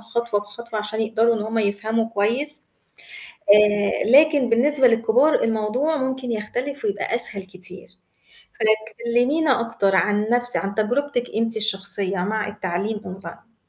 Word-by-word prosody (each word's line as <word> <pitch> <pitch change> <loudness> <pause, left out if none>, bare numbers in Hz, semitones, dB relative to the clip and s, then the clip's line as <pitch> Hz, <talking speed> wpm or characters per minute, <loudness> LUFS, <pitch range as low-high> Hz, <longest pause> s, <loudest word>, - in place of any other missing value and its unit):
خطوة 225 -1 -2
بخطوة 215 +2 -8
عشان 210 +1 -4
يقدروا 225 +1 +2
إن 210 - -3
هُم 220 +1 -3
يفهموا 215 +2 -1
كويس، 235 +8 0 0.9
آآ، 205 0 +3
لكن 290 -2 +5
بالنسبة 265 +3 +4
للكبار 235 +6 +2
الموضوع 225 +8 0
ممكن 260 -2 -3
يختلف 245 +5 -4
ويبقى 205 +2 -2
أسهل 215 -4 -1
كتير 185 0 -11 0.7
فلك 220 0 0
كلّمينا 255 +3 +2
أكتر 200 -4 0
عن 210 +3 +1
نَفْس 245 0 +1
عن 195 +1 -3
تجربتِك 245 +4 -1
أنتِ 225 0 0
الشخصية 200 -2 -1
مع 210 +3 -2
التعليم 205 +1 -3
Online. 205 +3 -11
225 Hz, 130 wpm, -22 LUFS, 205-245 Hz, 0.9 s, لكن